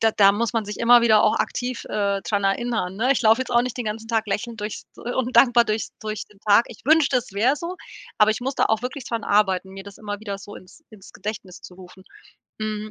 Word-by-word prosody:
da 225 - +4
da 200 -1 +5
muss 230 +3 -1
man 225 -2 -1
sich 210 +1 -7
immer 240 +1 +6
wieder 220 -2 +5
auch - - +3
aktiv, 250 0 -3
äh, 200 -1 -1
dran 200 -2 -1
erinnern, 195 -2 -1
ne? 255 +5 +2
Ich 255 - -2
laufe 225 +3 +4
jetzt 260 - -4
auch 240 0 +4
nicht 250 -2 -5
den 245 - -4
ganzen 220 +1 -5
Tag 225 -1 0
lächelnd 225 +2 -4
durchs 210 0 -5
und 250 +1 -3
dankbar 240 -2 +6
durch 215 0 -2
durch 215 -1 -5
den 210 - -23
Tag. 210 +2 +4
Ich 230 - -12
wünschte, 300 -3 +4
es 245 -4 -9
wär 240 +9 +2
so, 340 +4 -6 0.4
aber 210 0 +5
ich 220 - -2
muss 265 +2 -3
da - - +2
auch 220 0 0
wirklich 255 +1 -5
dran 230 -2 -3
arbeiten, 190 -2 +1
mir 195 0 -9
das 200 -1 -12
immer 205 -1 -6
wieder 200 -2 -5
so 205 +1 -11
ins 185 - -16
ins 205 -3 -15
Gedächtnis 200 -4 -7
zu 180 - -12
rufen. 185 +1 -15 0.6
Hm, 215 0 -4
215 Hz, 245 wpm, -23 LUFS, 205-240 Hz, 0.6 s, immer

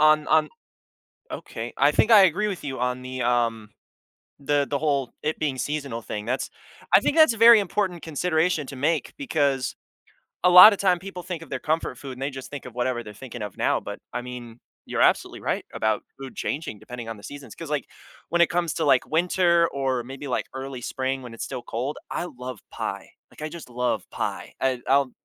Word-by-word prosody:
on 155 0 +5
on 155 0 +4 0.8
okay - - -6
I - - +5
think 225 - +3
I 210 -3 +9
agree 190 +5 +1
with 195 -4 -4
you 135 -3 -4
on 125 0 -1
the, 130 0 -5
um, 115 -3 0 0.7
the 145 0 +1
the 140 - 0
whole 140 -4 0
it 155 - -1
being 145 -4 -1
seasonal 140 -4 -3
thing. 105 -1 -5
That's 125 +3 -2 0.4
I - - +9
think 290 - 0
that's 315 -7 +7
a 225 - -8
very 230 0 +9
important 190 -3 -1
consideration 160 -1 0
to 140 - -7
make 150 +4 0
because 145 - 0 0.7
a 180 - +6
lotta 185 +3 +10
time 185 -2 +3
people 180 -1 -8
think 180 -3 -5
of 150 - -15
their 130 - -3
comfort 155 -4 -1
food 135 -1 -7
and 130 - -11
they 135 - -1
just 130 -1 -8
think 145 -3 -7
of 125 - -9
whatever 120 0 -1
they're 105 - -10
thinking 120 +1 -9
of 105 -2 -6
now. - - +2
But, - - -7 0.2
I 125 - -2
mean, 120 -1 -9 0.3
you're - - -1
absolutely - - +2
right - - -2
about 110 -1 0 0.2
food 135 -1 -8
changing 140 -8 -3
depending 120 0 -8
on 115 - -6
the 100 - -15
seasons. 145 +4 -9
'Cause, 165 -3 -8
like, 150 - -1 0.4
when 170 - +2
it 170 - +6
comes 170 -3 0
to, 160 - 0
like, 135 -3 +4
winter 170 +1 +3
or 135 -3 -1
maybe, 135 +3 -8
like, 125 - -1
early 130 -1 -6
spring 130 +2 -2
when 120 -2 -9
it's 115 - -6
still 125 - -5
cold, 130 +6 -3
I - - -2
love 125 -5 -7
pie. - - -5 0.2
Like, - - -15
I 155 - -3
just 170 -5 -10
love 125 0 -1
pie. - - -4
I 130 -2 +1
I'll 135 -1 +3
140 Hz, 210 wpm, -25 LUFS, 125-165 Hz, 0.8 s, lotta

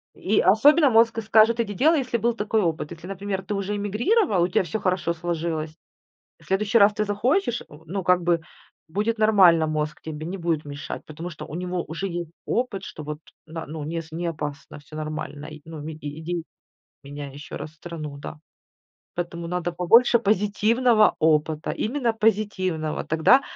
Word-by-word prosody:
И 205 +2 +1
особенно 285 - +6
мозг 225 -1 +4
скажет 225 +2 +4
иди 210 -3 -1
делай, 305 - +4
если 250 -2 -1
был 235 +2 +1
такой 215 0 0
опыт. 160 -3 -1
Если, 170 +1 -9
например, 195 0 -4
ты 200 - -4
уже 200 +1 -2
эмигрировал, 210 - +1
у - - +2
тя 185 - +1
всё 180 +5 -3
хорошо 185 -3 0
сложилось, 160 -2 -3 0.6
в - - -20
следующий 205 +4 +2
раз 205 +1 +6
ты 210 - 0
захочешь, 240 - 0
э, - - -12 0.2
ну 190 +4 -3
как 180 0 +3
бы 170 -1 +2 0.5
будет 210 +7 -1
нормально 185 -7 +5
мозг, 150 0 -2
тебе 155 -1 -6
не 185 +4 -4
будет 165 -3 -1
мешать. 145 0 -6
Потому 160 +3 -7
что 155 - -8
у - - -11
него 180 0 -2
уже 170 +5 -4
есть 170 -2 -5 0.2
опыт, 225 -6 -1
что 155 - -8
вот 150 0 -5 0.3
на 160 0 -7
ну, 155 -1 -6
с 165 -1 -5
не 170 +2 -4
опасно, 150 -3 -5
всё 150 +1 -14
нормально, 155 0 -5 0.2
ну 155 -2 -8
и 155 -1 -6 0.2
иди 170 0 -3 0.6
меняй 140 0 -8
еще 145 +2 -9
раз 155 - -6
страну, 155 -3 -7
да. 150 +1 -8 0.8
Поэтому 170 -1 -4
надо 175 -1 -2
побольше 230 +8 +5
позитивного 215 +2 +3
опыта, 155 0 +1
именно 240 0 -1
позитивного, 195 -7 0
тогда 160 - +4
180 Hz, 175 wpm, -24 LUFS, 160-215 Hz, 0.8 s, особенно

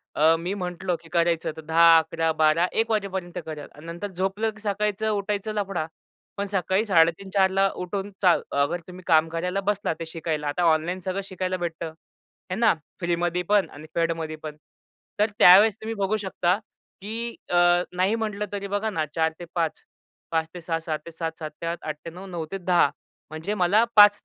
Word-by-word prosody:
अ, 160 +2 +5
मी 180 +4 -3
म्हटलो, 180 -1 -2
की 165 - -16
करायचं 170 -2 +1
तर - - -6
10, 165 +1 +6
11, 165 0 +1
12, 155 +2 +3
01:00 225 +1 +1
वाजेपर्यंत 190 -4 -2
करेल 155 -2 -7
आणि 150 +2 -13
नंतर 170 +5 -5
झोपलं, 195 +4 -1
की 215 -1 -17
सकाळीच 210 0 -1
उठायचं 210 0 -1
लफडा. 195 -6 -2 0.5
पण 200 - -1
सकाळी 190 +3 +1
03:30-04:00 190 +2 +3
उठून 195 +2 -4
चा 180 -2 +6 0.3
अगर 175 +5 0
तुम्ही 180 0 -11
काम 160 0 +5
करायला 180 +4 -2
बसला 200 -5 0
ते 165 - -4
शिकायला. 160 -2 -3
आता 175 +5 -1
ऑनलाईन 170 +4 0
सगळं 190 +1 -1
शिकायला 185 -1 -3
भेटतं. 170 -1 -4
आहे 165 +3 -12
ना 230 -2 +5 0.3
फ्रीमध्ये 175 0 0
पण 205 -2 +4
आणि 150 +2 -11
पेडमध्ये 165 -2 -1
पण. 150 -1 -6 0.6
तर 210 +1 +3
त्यावेळेस 200 +3 +8
तुम्ही 225 +1 -3
बघू 200 +2 0
शकता 190 -2 0 0.4
की 230 +3 -4
अ, 175 - 0 0.4
नाही 190 +5 +2
म्हटलं 210 -2 -2
तरी 200 -1 -4
बघा 205 +2 -1
ना 160 -6 -1
04:00 160 0 +2
ते 175 - -7
05:00. 165 -2 -1 0.5
05:00 160 -1 +1
ते 175 - -8
06:00, 165 0 -2
06:00 160 -2 -3
ते 170 - -8
07:00, 165 0 -3
07:00 155 -1 -5
ते - - -4
08:00, 170 +1 -2
08:00 155 -1 -3
ते - - -4
09:00, 180 +4 -10
09:00 170 -3 -4
ते 195 - -2
10:00. 175 -5 +3 0.4
म्हणजे 160 +7 -4
मला 205 +3 +4
5 205 0 +9
180 Hz, 190 wpm, -25 LUFS, 165-200 Hz, 0.6 s, 5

